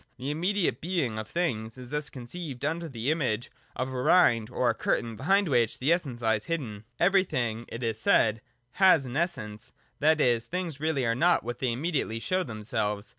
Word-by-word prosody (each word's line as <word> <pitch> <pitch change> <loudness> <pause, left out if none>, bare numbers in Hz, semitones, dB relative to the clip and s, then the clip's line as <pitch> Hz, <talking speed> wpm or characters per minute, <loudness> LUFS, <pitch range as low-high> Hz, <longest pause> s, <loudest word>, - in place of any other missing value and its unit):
The 130 +4 -3
immediate 180 +5 0
Being 155 -11 -1
of 110 - -6
things 115 -10 -2
is 125 -1 -10
thus 150 0 -2
conceived 135 +1 -6
under 165 +2 -2
the 125 +2 -1
image 125 -8 -1 0.2
of 130 +1 -3
a 125 - -2
rind 120 -8 +4
or 125 -1 +1
curtain 115 0 -1
behind 195 - +2
which 120 -6 +2
the 145 +6 +3
Essence 135 -9 -3
lies 110 0 +1
hidden. 120 -11 -4
Everything, 125 - +1
it 115 - -7
is 110 -2 -1
said, 110 -1 +3 0.3
has 185 -4 +5
an 125 0 -6
Essence; 110 -11 -3 0.3
that 155 +1 +4
is, 120 -4 +2
things 175 -5 -4
really 150 -4 0
are 115 - +2
not 170 +9 +3
what 120 +1 -5
they 130 -2 0
immediately 135 -3 -1
show 185 +10 0
themselves. 105 - -2
130 Hz, 180 wpm, -28 LUFS, 115-165 Hz, 0.3 s, has